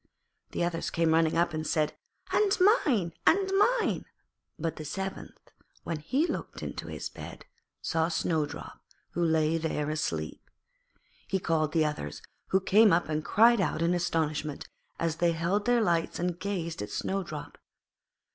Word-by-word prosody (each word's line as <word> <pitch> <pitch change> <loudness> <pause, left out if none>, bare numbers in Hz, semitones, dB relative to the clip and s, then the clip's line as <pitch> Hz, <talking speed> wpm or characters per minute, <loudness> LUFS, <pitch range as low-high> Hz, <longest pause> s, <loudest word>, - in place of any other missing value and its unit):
The - - 0
others 170 -1 -1
came 165 -1 +2
running 165 0 +3
up 170 -1 +2
and 155 0 -3
said, 155 -1 +1 0.4
'And 410 -1 +3
mine, 280 - +3
and 385 -1 +4
mine.' 450 +4 +2 0.5
But 165 -1 -3
the 155 - -6
seventh, 190 +6 -6 0.3
when 165 - -3
he 260 - +1
looked - - -5
into - - -5
his - - -5
bed, - - -10 0.4
saw 160 -1 +1
Snowdrop, 160 -2 -2 0.3
who 175 - -1
lay 160 0 +2
there 155 -2 -1
asleep. 80 - -3 0.9
He 195 - +1
called 160 -4 0
the 160 -1 +3
others, 75 - -4 0.2
who 190 - +3
came 210 +2 +5
up 170 -1 +2
and 155 0 -1
cried 230 +3 +5
out 165 -3 0
with 170 +1 +3
astonishment, 155 -4 -1 0.3
as 165 -1 -1
they 170 0 +2
held 175 +6 0
their 245 -1 +4
lights 170 -5 +1
and 175 0 -2
gazed 180 - -3
at 105 - -5
Snowdrop. 170 - -4
165 Hz, 155 wpm, -29 LUFS, 155-195 Hz, 0.9 s, came